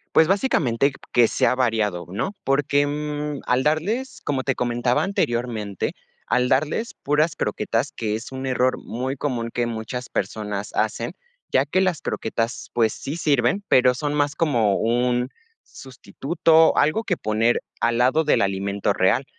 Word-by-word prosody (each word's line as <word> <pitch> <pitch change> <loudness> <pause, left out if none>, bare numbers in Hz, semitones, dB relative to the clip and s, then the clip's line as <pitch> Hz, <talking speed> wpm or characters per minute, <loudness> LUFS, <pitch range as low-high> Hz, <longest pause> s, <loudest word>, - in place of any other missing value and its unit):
Pues, 160 - +6
básicamente, 150 - +2 0.2
que 120 -1 +6
sea - - +2
variado, 110 -9 0
¿no?, 115 - -3
porque, 145 +1 +2
mm, 150 0 -3
al 125 +1 +2
darles, 200 - -1
como 140 -2 0
te 135 -1 0
comentaba 120 0 0
anteriormente, 120 - -2 0.3
al 125 0 +1
darles 155 - 0
puras 150 +2 +2
croquetas, - - -1
que 110 -2 -2
es 110 +4 -7
un 130 0 -5
error 130 0 +1
muy 130 +4 -4
común 120 -5 -2
que 120 -1 0
muchas 115 +2 -5
personas 105 0 -3
hacen, 115 +5 -1 0.4
ya 130 - +3
que 180 +6 +1
las 185 -5 0
croquetas, 115 +2 -3
pues, 115 -2 +2
sí 145 +4 -6
sirven, 145 +3 +1
pero, 125 0 +5
son 145 +3 -2
más 145 0 +1
como 120 -12 +2
un 125 +2 +1 0.3
sustituto, 155 - +1
algo 155 +9 +2
que 185 - 0
poner 110 -1 +1 0.2
al 120 0 +1
lado 130 +6 +3
del 150 - +3
alimento 100 +1 0
real. 100 +8 +2
125 Hz, 150 wpm, -23 LUFS, 115-150 Hz, 0.4 s, Pues